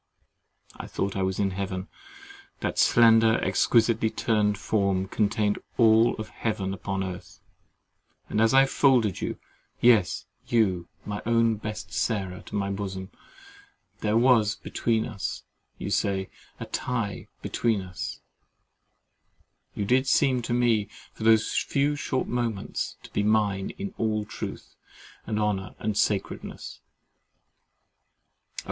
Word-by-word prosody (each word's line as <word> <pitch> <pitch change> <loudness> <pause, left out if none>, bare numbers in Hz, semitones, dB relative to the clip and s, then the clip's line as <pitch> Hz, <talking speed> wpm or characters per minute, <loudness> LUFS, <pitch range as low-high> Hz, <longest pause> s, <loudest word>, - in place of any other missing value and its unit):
I - - -7
thought 100 0 -3
I 95 - -1
was 95 0 -1
in 100 -1 +1
heaven—that 395 - -7
slender 115 -1 +6
exquisitely 115 -1 +2
turned 105 -2 +1
form 100 -2 0
contained 105 0 +1
my - - -12 0.2
all 110 +2 +5
of 110 0 -7
heaven 100 -4 -2
upon 95 0 -3
earth; 95 -1 -8 0.9
and 110 - 0
as 115 - +4
I 135 0 +6
folded 125 -7 +2
you—yes, 115 -7 0 0.2
you, 95 -7 +1 0.2
my 105 0 -4
own 115 -1 +3
best 110 0 -6
Sarah, 95 -5 -1
to - - -6
my 100 -1 -1
bosom, 95 -1 -5 0.9
there 105 +1 +1
was, 115 -4 +4
as 110 -3 -2 0.3
you - - -5
say, 95 -1 0 0.3
A - - -5
TIE 115 -5 -3 0.2
BETWEEN 115 -4 0
US—you 95 +2 -11
did 130 +5 +2
seem 130 -3 +3
to 120 - -5
me, 115 -4 +2 0.2
for - - -8
those 110 -1 +4
few 145 +1 +1
short 130 -2 -1
moments, 120 -4 -3
to - - -13
be - - 0
mine 105 -2 +1
in 195 -1 -5
all 110 -1 0
truth - - -7 0.5
and 110 -1 -1
honour 100 -3 -1
and 110 -1 -2
sacredness—Oh! 100 -1 -3
110 Hz, 120 wpm, -26 LUFS, 100-115 Hz, 0.9 s, slender